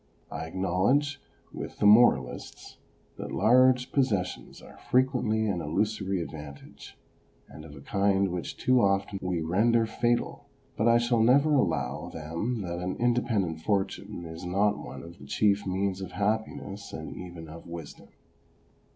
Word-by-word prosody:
I - - -4
acknowledge, 100 - +1 0.3
with - - -7
the - - 0
moralists, 105 - +3 0.4
that - - -6
large 125 +2 +4
possessions 110 -10 -1
are - - -15
frequently 125 -4 +2
an 95 -5 -1
illusory 95 +2 -1
advantage, 75 -3 -11 0.5
and 75 - -12
of 75 -2 -11
a 70 - -11
kind 100 +3 +1
which 90 -1 -5
too 130 -1 +3
often 100 0 +1
we 90 -3 -1
render 110 +8 +2
fatal; 120 +2 -1 0.3
but 110 - +1
I 115 0 +6
shall 120 -1 +2
never 140 +6 +4
allow 75 - 0
them 85 +10 -4
that 85 -1 -4
an 90 +1 -3
independent 115 -9 0
fortune 95 -2 -2
is 80 +1 -8
not 100 +4 +1
one - - -9
of 85 +1 -12
the 70 - -12
chief 100 +5 +1
means 95 0 -1
of 95 - -7
happiness 100 0 -3
and 80 - -7
even 85 -2 -9
of 80 +2 -11
wisdom. 85 -3 -9
100 Hz, 145 wpm, -28 LUFS, 85-115 Hz, 0.5 s, I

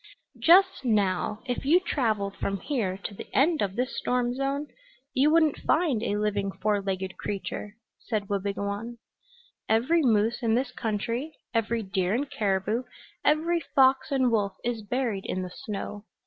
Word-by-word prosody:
"Just 375 -1 +5
now, 210 -2 +1
if 250 -2 -2
you 315 +6 +5
traveled 215 - -1
from 195 0 -2
here 210 -10 -1
to - - -5
the - - -9
end 310 +3 +4
of 195 -1 -1
this 250 +2 -1
storm 245 -1 0
zone 275 +2 -1 0.5
you 275 +3 +4
wouldn't 315 -2 +3
find 310 -9 +2
a 205 -2 -1
living 205 -2 0
four 210 0 0
legged 190 -1 -3
creature," 205 +1 -5 0.2
said 215 -4 -3
Wabigoon. 200 +3 -3 0.7
"Every 255 +10 +3
moose 225 -2 +2
in 225 -2 +2
this 250 +1 0
country, 230 +7 -3 0.2
every 230 0 0
deer 190 0 0
and 280 +4 -1
caribou, 205 +1 0 0.4
every 325 +3 +2 0.2
fox 265 0 +4
and 260 -3 +3
wolf, 205 -3 +1
is 235 -2 -2
buried 220 -2 -2
in 185 - -2
the 180 - -6
snow. 210 -1 -6
225 Hz, 155 wpm, -27 LUFS, 200-270 Hz, 0.7 s, Just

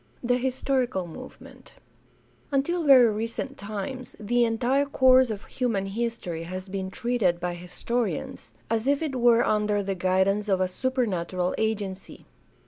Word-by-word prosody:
IV. 245 - -5
THE 245 - +4
HISTORICAL 255 -5 -1
MOVEMENT 165 - -12 0.8
Until 320 +5 0
very 255 -5 +7
recent 230 +5 -4
times 215 +5 -6
the 240 +3 +1
entire 250 +5 +1
course 260 -2 +5
of 210 -2 -5
human 230 -7 -1
his 230 +4 -2
tory 170 -5 -5
has 185 +3 -6
been 190 0 -4
treated 230 -6 0
by 175 0 -2
historians 180 - -4 0.2
as 225 +2 -1
if 285 +2 +2
it 290 -4 -3
were 240 -1 +4
under 210 -1 +1
the 195 0 -2
guidance 190 +3 +1
of 190 -1 +2
a 185 - +2
supernatural 185 -6 -1
agency. 205 -3 -3
220 Hz, 145 wpm, -26 LUFS, 190-250 Hz, 0.8 s, very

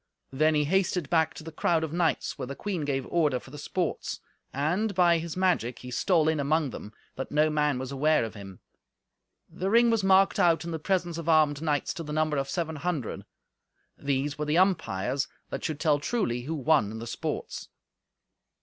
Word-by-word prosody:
Then 155 +3 +2
he 150 - +3
hastened 180 -1 0
back 160 -2 +2
to - - -9
the 165 - -8
crowd 160 +1 +1
of 160 -1 -4
knights, 170 -2 0
where 125 - -5
the 140 - -6
queen 185 -5 -3
gave 135 -2 -1
order 150 -7 +1
for 130 - -15
the 150 - -9
sports, 175 +3 -3 0.3
and, 180 +10 0
by 175 -2 +4
his 165 +1 -6
magic, 175 -11 +1
he 125 - -9
stole 160 - +2
in 160 -1 +1
among 145 0 +1
them, 105 - -8 0.3
that 135 - -4
no 150 +1 +3
man 150 -3 +1
was 130 +1 -5
ware 155 +2 +3
of 110 - -7
him. 95 -3 -11 0.9
The 190 +2 -3
ring 235 +2 +5
was 225 -3 +1
marked 195 0 +4
out 170 -1 +3
in 170 - -4
the 160 - -3
presence 175 -1 -1
of 165 0 -4
armed 155 -2 +4
knights 150 -3 0
to 175 - -6
the 150 -2 -6
number 155 -1 +1
of 135 0 -2
seven 160 -1 -2
hundred. 155 -6 -3 0.7
These 140 +1 -2
were 150 - -1
the 150 +2 +1
umpires, 140 - +1 0.2
that - - -4
should 155 -2 -3
tell 150 -2 +2
truly 145 - -1
who 160 +3 -3
won 150 -6 +2
in 110 - -6
the 115 - -6
sports. - - -5
155 Hz, 205 wpm, -28 LUFS, 140-170 Hz, 0.9 s, ring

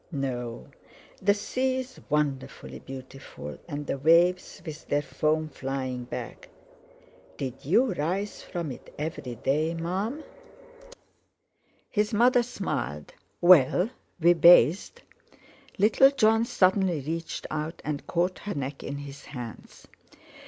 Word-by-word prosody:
no. 125 - -4 0.5
The 200 +1 +4
sea 255 +5 -1
is 260 0 -6
wonderfully 145 -3 -2
beautiful, 130 - -9
and 145 -2 -5
the 135 - -3
waves, 170 +5 +3
with 155 -2 -8
their 145 0 +1
foam 155 +1 0
flying 130 -3 -4
back." - - -7 0.9
"Did 130 -1 -5
you 225 - +3
rise 185 +6 -2
from 170 -5 -5
it 125 - -11
every 150 -5 -4
day, 150 +7 0
Mum?" 195 - -3 1.7
His 210 0 0
mother 245 +3 +5
smiled. 185 - -4 0.3
"Well, 180 - +6 0.3
we 170 +1 +6
bathed." 170 +1 +5 0.7
Little 220 +6 +6
Jon 225 -4 +3
suddenly 185 -6 +2
reached 165 +4 -4
out 155 +2 -3
and 150 -2 -4
caught 180 +2 0
her 205 - -5
neck 140 0 -4
in 140 - -4
his 140 0 -9
hands. 120 -5 -9
160 Hz, 115 wpm, -27 LUFS, 135-195 Hz, 1.7 s, Well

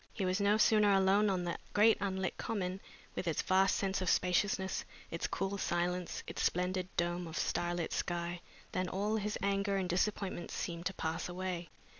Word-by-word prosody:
He 195 - -2
was 185 +2 +1
no 205 +1 +4
sooner 210 -1 +5
alone 195 +2 +4
on 185 -2 0
the 175 -1 -3
great 215 +2 +6
unlit 190 -2 -1
Common 190 -3 -3 0.3
with 180 - -4
its 165 - 0
vast 190 +1 +4
sense 195 -1 0
of 185 - 0
spaciousness, 190 +1 +1 0.3
its 165 - -2
cool 195 +1 -2
silence, 175 0 -1
its - - -5
splendid 180 +1 0
dome 175 0 0
of 160 - -6
starlit 175 -1 -1
sky, 175 0 -2 0.3
than 185 -1 -1
all 205 +4 0
his 210 0 -2
anger 200 0 +1
and 190 -1 -1
disappointment 185 0 -1
seemed 170 0 -3
to 195 - -3
pass 160 +2 -2
away. 180 -1 -4
185 Hz, 175 wpm, -34 LUFS, 175-200 Hz, 0.3 s, great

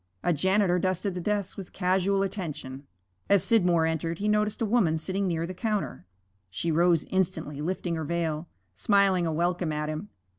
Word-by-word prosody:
A 175 - +2
janitor 190 +3 +2
dusted 185 +1 -1
the 180 - -4
desks 205 0 -1
with 195 -3 -8
casual 190 +1 +1
attention. 145 -8 -5 0.4
As 200 -3 +5
Scidmore 175 -7 +3
entered 160 +1 -1
he 205 - -2
noticed 210 0 +1
a 230 - +1
woman 200 -8 +2
sitting 190 +4 -2
near 165 -2 -1
the 185 - -6
counter. 200 - -3 0.4
She 135 - -2
rose 170 0 +3
instantly, 165 -6 -1
lifting 175 +1 -2
her 160 - -3
veil, 165 0 -2 0.3
smiling 190 - +3
a - - 0
welcome 175 +1 0
at 150 0 -2
him. 155 +7 -5
180 Hz, 175 wpm, -27 LUFS, 160-195 Hz, 0.4 s, As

